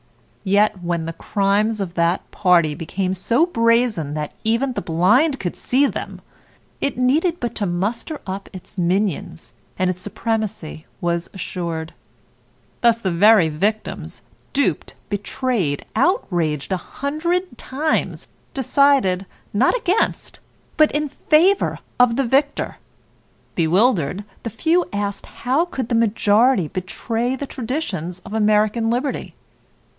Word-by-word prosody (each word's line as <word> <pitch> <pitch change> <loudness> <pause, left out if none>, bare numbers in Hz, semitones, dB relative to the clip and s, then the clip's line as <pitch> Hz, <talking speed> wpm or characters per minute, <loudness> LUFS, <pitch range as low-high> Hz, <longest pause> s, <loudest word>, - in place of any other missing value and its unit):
Yet 200 -1 +2
when 170 -1 -1
the 165 - -4
crimes 205 +4 0
of 190 -4 -3
that 170 +1 0
party 175 -6 +3
became 185 +5 -2
so 230 - +2
brazen 230 - +1
that 150 -1 -3
even 235 +4 +1
the - - -3
blind 230 - +3
could 175 - -3
see 270 +3 +2
them, - - -4 0.6
it 280 - -1
needed 310 +8 +2
but 240 -1 -3
to 205 - 0
muster 210 - -2
up 195 +1 -5
its 185 - -11
minions, 180 -1 -1 0.2
and 185 0 +2
its 185 0 -8
supremacy 205 -6 -3
was 170 0 -1
assured. 170 -3 -4 0.9
Thus 235 -1 +4
the 190 -5 -1
very 195 0 +5
victims, 205 +8 -3 0.3
duped, 285 0 0 0.2
betrayed, 205 - -1
outraged 175 - 0
a 190 - +2
hundred 315 - -2
times, 300 +4 -1 0.3
decided, 265 -8 +3 0.3
not 245 - +3
against, 420 -2 -1 0.4
but 310 -1 +5
in 295 0 0
favor 330 +7 +3 0.2
of 245 -2 +5
the 275 - +1
victor. 275 +4 +1 0.8
Bewildered, 185 - +2 0.2
the 230 - -4
few 330 - +1
asked 205 -1 -3
how 265 +8 0
could 265 -9 -4
the - - -1
majority 225 -2 +3
betray 225 - -2
the 280 - -4
traditions 225 - -4
of - - -8
American 215 +1 +2
liberty? 255 +4 -2
215 Hz, 125 wpm, -21 LUFS, 180-260 Hz, 0.9 s, very